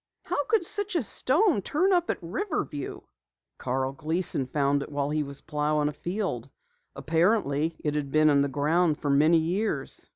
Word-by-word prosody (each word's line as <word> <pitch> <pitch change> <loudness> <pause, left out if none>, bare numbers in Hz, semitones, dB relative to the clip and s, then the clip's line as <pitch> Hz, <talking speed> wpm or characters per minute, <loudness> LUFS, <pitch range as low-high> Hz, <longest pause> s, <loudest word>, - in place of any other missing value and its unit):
"How 315 -5 -1
could 435 -5 +1
such 410 +1 -2
a 335 - +2
stone 295 - +2
turn 365 - +1
up 350 -1 +1
at - - 0
Riverview?" 170 - -3 0.6
"Carl 130 +1 -1
Gleason 155 -1 -2
found 140 +1 +1
it 140 - -7
while 145 0 -1
he 155 0 0
was 140 -1 -6
plowing 150 -1 0
a - - -6
field. 160 - -3 0.5
Apparently, 160 0 +1
it 150 - 0
had 150 -2 -2
been 155 +1 +4
in 140 -1 +4
the 140 - +2
ground 150 +3 +1
for 145 - -1
many 155 +4 +5
years." 180 +7 -2
155 Hz, 170 wpm, -27 LUFS, 145-210 Hz, 0.6 s, many